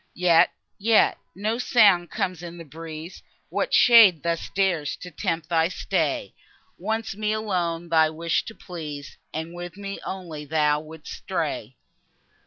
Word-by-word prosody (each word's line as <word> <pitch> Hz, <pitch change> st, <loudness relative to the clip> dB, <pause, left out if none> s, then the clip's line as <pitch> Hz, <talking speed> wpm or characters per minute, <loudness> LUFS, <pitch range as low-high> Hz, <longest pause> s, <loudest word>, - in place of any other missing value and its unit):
Yet, 175 Hz, -2 st, +5 dB, 0.3 s
yet, 220 Hz, +2 st, +4 dB, 0.2 s
no 215 Hz, +5 st, -1 dB
sound 200 Hz, -9 st, +4 dB
comes 180 Hz, 0 st, -2 dB
in 175 Hz, 0 st, -8 dB
the 165 Hz, -, -9 dB
breeze! 160 Hz, +2 st, -9 dB, 0.3 s
What -, -, -1 dB
shade 220 Hz, -, +7 dB
thus 170 Hz, -1 st, -2 dB
dares 180 Hz, -7 st, 0 dB
to 180 Hz, -, -10 dB
tempt 165 Hz, 0 st, -2 dB
thy 165 Hz, -1 st, +3 dB
stay? 160 Hz, -, -1 dB, 0.5 s
Once, 220 Hz, +2 st, -2 dB
me 215 Hz, +1 st, -1 dB
alone 175 Hz, -6 st, -2 dB
thou 160 Hz, -1 st, +4 dB
wish'd 165 Hz, +1 st, -1 dB
to 225 Hz, -, -8 dB
please, 150 Hz, -5 st, -8 dB
And 160 Hz, +2 st, -5 dB
with 175 Hz, +1 st, -8 dB
me 200 Hz, 0 st, -6 dB
only 170 Hz, -6 st, -6 dB
thou 150 Hz, 0 st, +2 dB
wouldst 155 Hz, 0 st, -10 dB
stray. -, -, -4 dB
170 Hz, 145 wpm, -25 LUFS, 160-195 Hz, 0.5 s, shade